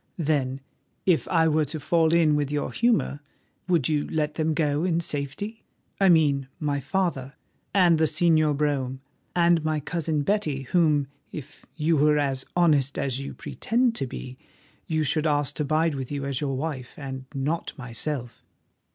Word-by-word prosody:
Then, 140 -5 0 0.4
if 180 -4 +2
I 165 -2 +3
were 155 -1 +2
to 150 +3 -4
fall 160 +1 +2
in 165 -3 +4
with 145 -1 -1
your 145 -1 -1
humour, 230 -11 +1 0.5
would 170 -8 +2
you 150 -2 0
let 150 -1 -1
them 155 0 0
go 150 0 +1
in 170 -2 +1
safety?—I 180 +6 -3
mean 145 -5 +3
my 145 -2 -1
father 140 -2 -2 0.4
and 175 -5 +4
the 160 - +4
Señor 155 -1 +3
Brome 135 -3 -1 0.4
and 170 -2 +4
my 155 -1 0
cousin 155 -1 -1
Betty, 155 -8 0
whom, 150 -1 +2 0.3
if 150 -3 -10
you 160 +1 +2
were 150 +1 +4
as 135 -2 0
honest 150 -6 +3
as 135 -2 -1
you 140 - -6
pretend 240 +1 0
to 135 - -2
be, 130 +1 -8 0.5
you 155 -1 0
should 155 +2 +1
ask 145 -1 +1
to 150 - 0
bide 155 +2 +2
with 135 -2 -5
you 140 -1 -3
as 140 -1 -2
your 135 -2 -1
wife, 135 -4 -4
and 135 -2 -6
not 150 +5 -2
myself." 125 0 -4
150 Hz, 165 wpm, -25 LUFS, 140-165 Hz, 0.5 s, in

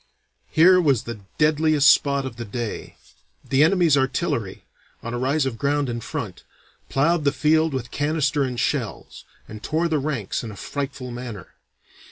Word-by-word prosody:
Here 180 +3 +6
was 140 -8 +2
the 115 -2 -7 0.2
deadliest 155 -1 +3
spot 140 -2 +4
of 120 -3 -7
the 120 - -5
day. 115 +1 -5 0.5
The 140 +2 +4
enemy's 165 -2 +4
artillery, 135 - -1 0.4
on 115 - -5
a 120 - -2
rise 135 +3 +1
of 120 -4 -4
ground 145 -1 0
in 120 0 -4
front, - - -6 0.5
plowed 155 +4 +2
the 140 - +3
field 160 +2 +2
with 130 -3 -4
canister 145 -1 0
and 125 -3 -2
shells, - - -3 0.2
and 105 0 -9
tore 160 +7 0
the 155 -3 0
ranks 135 -9 -3
in 115 - -6
a 105 - -9
frightful 135 +2 -5
manner. 120 -6 -7
140 Hz, 165 wpm, -23 LUFS, 120-155 Hz, 0.5 s, Here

